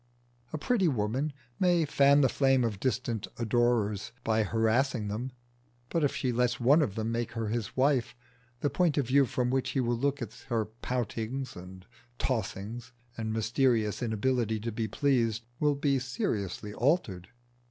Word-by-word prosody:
A 155 - -3
pretty 195 - +1
woman 130 +3 0 0.3
may 175 -3 +3
fan 140 0 +5
the 135 - +5
flame 135 0 +3
of 110 -4 -2
distant 120 -3 -1
adorers 115 -3 +1
by 110 0 +2
harassing 110 +1 +1
them, 120 +6 -3 0.6
but 165 - 0
if 145 - +1
she 130 - 0
lets 120 0 +1
one 140 +7 +5
of 110 -10 -1
them 110 0 -2
make 120 0 -2
her 115 -2 -2
his 115 +1 -3
wife, 130 -3 +2 0.5
the 145 - +1
point 170 -5 +2
of 140 - +2
view 135 +2 +4
from 125 +2 -1
which 130 0 0
he 135 - -1
will 120 -1 +1
look 140 +4 0
at 115 -3 -6 0.2
her 115 -3 +1
poutings 120 +3 -4
and 90 +1 -11 0.3
tossings 115 - -3 0.2
and 110 -1 -3
mysterious 110 0 +1
inability 115 -1 0
to 115 +1 -3
be 110 0 -2
pleased 115 -1 +1
will 150 -1 +2
be 140 -1 +1
seriously 105 -5 -3
altered. 115 - 0
120 Hz, 165 wpm, -29 LUFS, 110-135 Hz, 0.6 s, fan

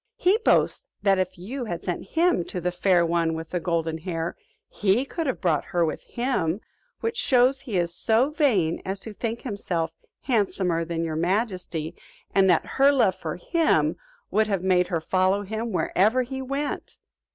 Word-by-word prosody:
He 385 +5 +3
boasts - - +2 0.2
that 195 -2 +4
if 185 +1 -2
you 240 +9 -5
had 175 -5 -5
sent 175 -2 -3
him 340 - +3
to 180 - -5
the 180 +1 -1
Fair 180 -1 +3
One 165 -1 +1
with 160 0 -7
the 180 - 0
Golden 165 -2 -1
Hair, 165 -1 -3 0.3
he 210 +6 +1
could 325 +2 -3
have 260 - -1
brought 160 -6 +1
her 175 -1 +1
with 155 - -3
him; 235 -9 -1 0.4
which 455 +1 -2
shows 260 - +3
he 235 -8 -3
is 170 -1 0
so 230 +9 +2
vain 220 - +2
as 190 +1 -3
to 220 - -7
think 230 +2 -3
himself 180 -8 -2 0.3
handsomer 190 -8 +1
than 165 0 -3
your 160 -1 -2
majesty 180 -3 -1 0.4
and 195 -1 +4
that - - +3
her 275 +1 +4
love 250 -9 +3
for 160 -2 -5
him 325 - +1 0.4
would 215 0 +3
have 195 -4 -1
made 180 -1 +3
her 170 -3 -1
follow 185 +4 +1
him 220 +3 -4
wherever 215 +6 +2
he 265 +2 -5
went." 275 +2 -4
190 Hz, 180 wpm, -25 LUFS, 170-245 Hz, 0.4 s, that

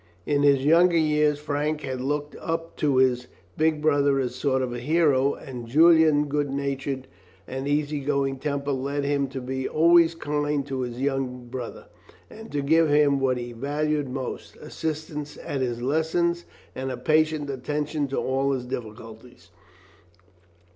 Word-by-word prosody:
In 145 -1 +1
his 140 -2 +4
younger 170 +3 +5
years 150 -2 +2
Frank 150 +1 -2
had 130 -2 -4
looked 145 +2 -2
up 165 0 -4
to 145 -3 +1
his 125 -1 +2 0.3
big 155 -1 +1
brother 145 -2 +3
as 125 -2 -1
a - - -13
sort 130 0 0
of 125 -1 -3
hero, 140 +1 +2
and 125 -3 -8
Julian's 160 +1 +5
good 145 0 -1
nature 135 -1 -3 0.4
and 135 +1 -4
easy 145 0 0
going 140 -1 -1
temper 140 0 -2
led 140 +2 -2
him 140 -1 0
to 135 0 -6
be 130 +1 -3
always 170 +1 +5
kind 145 -2 -1
to 135 -2 -3
his 120 -1 -5
young 130 -2 -2
brother, 125 -1 -7 0.5
and 225 +1 -11
to 145 -1 -1
give 160 +2 +4
him 145 -1 +4
what 130 -2 +1
he 120 0 -5
valued 145 +3 -1
most 130 0 -6
assistance 150 -2 -5
at 140 -2 -3
his 120 -2 -2
lessons 165 +5 0 0.3
and 130 0 -4
a 130 - -4
patient 155 +2 +1
attention 150 +2 -2
to 135 - -4
all 135 +1 0
his 125 -2 -3
difficulties. 115 -5 -9
140 Hz, 160 wpm, -25 LUFS, 130-150 Hz, 0.5 s, younger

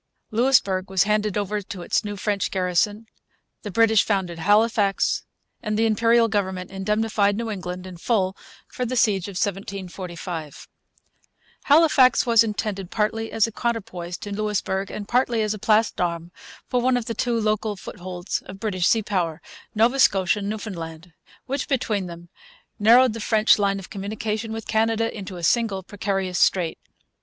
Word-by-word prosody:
Louisbourg 215 -6 +2
was 190 -2 +3
handed 210 0 0
over 205 +1 -1
to 190 -2 -8
its - - 0
new 205 -1 -5
French 205 0 -1
garrison; 190 +4 0 0.6
the 210 - -6
British 220 +1 +4
founded 185 -5 -1
Halifax; 205 +1 +2 0.4
and 215 -2 -2
the 225 - +3
Imperial 230 +1 +3
government 190 -3 -2
indemnified 205 +1 0
New 230 -1 -3
England 180 -2 -5
in 185 -2 -9
full 190 -1 0 0.3
for 250 - -5
the 250 +1 -2
siege 205 -6 +2
of 200 - -7
1745. 180 -5 -5 1.0
Halifax 290 -4 +5
was 230 -2 +5
intended 210 -4 -3
partly 225 +1 -1
as 225 - +3
a 230 - -5
counterpoise 190 -7 -3
to 205 - -8
Louisbourg, 200 -2 -2
and 205 -1 -6
partly 240 -2 +1
as 215 0 0
a 215 - -7
place 215 +2 +3
d'armes 170 -1 -3 0.4
for 250 - 0
one 255 0 +2
of 240 - -3
the 230 - -3
two 235 +1 0
local 215 -1 0
footholds 180 -1 -5
of 195 - -9
British 185 -5 0
sea 225 -1 +3
power, 175 -6 -1 0.4
Nova 235 +5 +3
Scotia 195 -4 +3
and 200 0 -3
Newfoundland, 175 -6 -6 0.3
which, 275 +1 -3
between 220 - -1
them, 170 0 -10 0.5
narrowed 235 +3 +6
the 230 - -6
French 215 0 +3
line 200 -1 +1
of 195 - -10
communication 215 +2 -4
with 225 0 -6
Canada 225 0 +1
into 190 -3 -7
a 170 - -8
single 200 0 +1
precarious 195 -2 -2
strait. 175 -4 +2
205 Hz, 160 wpm, -23 LUFS, 185-225 Hz, 1.0 s, narrowed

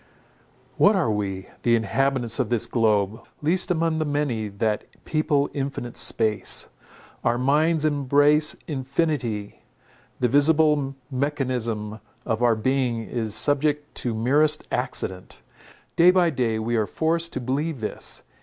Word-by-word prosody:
What 205 +1 +5
are 170 - +1
we, 95 -2 -3 0.2
the 120 -1 +3
inhabitants 120 +2 0
of 125 -5 0
this 120 -3 +1
globe, 110 -2 +1 0.2
least 175 +6 +2
among 165 -2 0
the - - +1
many 145 -7 -1
that 105 +1 -2 0.2
people 155 -3 +1
infinite 135 -4 -4
space? 110 -2 0 0.5
Our 120 - +1
minds 150 +5 +2
embrace 145 +1 +3
infinity; 135 -7 -2 0.6
the 125 - +2
visible 145 0 +3 0.2
mechanism 125 -6 -2 0.3
of 110 +1 -1
our 120 -2 +4
being 120 0 0
is 110 -3 -3
subject 145 0 +1
to 120 -3 0
merest 145 +7 +2
accident. 95 -7 -3 0.5
Day 170 +2 +6
by 180 -2 +4
day 120 -5 0
we 115 +2 -2
are 110 -2 0
forced 165 +1 -1
to - - -2
believe 135 +4 -2
this. 110 - -4
130 Hz, 130 wpm, -24 LUFS, 115-150 Hz, 0.6 s, Day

